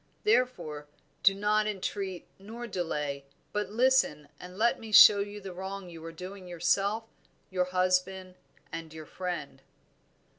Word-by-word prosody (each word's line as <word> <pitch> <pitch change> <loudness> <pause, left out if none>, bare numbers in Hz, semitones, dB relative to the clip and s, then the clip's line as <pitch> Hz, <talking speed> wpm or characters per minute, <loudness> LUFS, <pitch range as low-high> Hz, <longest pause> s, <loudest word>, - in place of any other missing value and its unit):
Therefore 250 - 0 0.3
do 195 - +5
not 210 +1 +1
entreat 195 -2 -4
nor 225 +5 -8
delay, 150 -9 -3 0.3
but 210 0 -1
listen 230 - +2
and 180 +1 -10
let 235 +3 +2
me 225 -1 -9
show 210 0 +9
you 205 +1 -4
the 195 -2 -8
wrong 190 0 -6
you 165 -1 -10
are 165 - -7
doing 185 +3 -9
yourself, 195 +5 0 0.5
your 180 -1 +1
husband, 185 0 0 0.4
and 165 -1 -6
your 155 -1 -8
friend." 170 -6 -5
190 Hz, 140 wpm, -29 LUFS, 175-210 Hz, 0.5 s, show